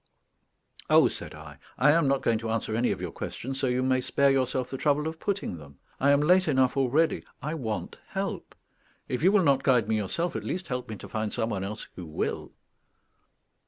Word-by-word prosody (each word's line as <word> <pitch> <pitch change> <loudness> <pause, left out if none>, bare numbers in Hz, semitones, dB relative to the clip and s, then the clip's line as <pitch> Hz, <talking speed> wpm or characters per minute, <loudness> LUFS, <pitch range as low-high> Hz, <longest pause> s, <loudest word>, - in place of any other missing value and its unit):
"Oh," - - +7
said - - -6
I, 75 -2 -12 0.2
"I 140 +5 +5
am 165 -2 +3
not 135 0 +1
going 115 -1 +2
to 115 0 -4
answer 110 -1 -1
any 120 +2 +2
of - - -3
your - - -4
questions, 135 +2 -5
so 135 - +1
you 125 +1 +1
may 130 0 +2
spare 140 +2 +2
yourself 130 -1 0
the 135 - -3
trouble 150 +1 +1
of 160 0 -5
putting 200 - -2
them. 70 -2 -14 0.2
I 140 - +3
am 140 0 +5
late 180 +5 +4
enough 130 -1 +3
already; 140 +5 +2 0.2
I 150 +2 -4
want 115 -9 -4
help. - - -4 0.5
If 125 - -2
you 185 +4 +5
will 205 -2 +4
not 140 -3 +3
guide 125 -6 +3
me 110 0 +1
yourself, 165 - -2
at - - -3
least 180 -1 -4
help 125 -2 -3
me 110 - -4
to - - -10
find 110 -1 -3
some 115 +1 -1
one 95 -2 -2
else 105 +3 -6
who 90 -3 -8
will." 75 - -3
130 Hz, 215 wpm, -27 LUFS, 110-145 Hz, 0.5 s, Oh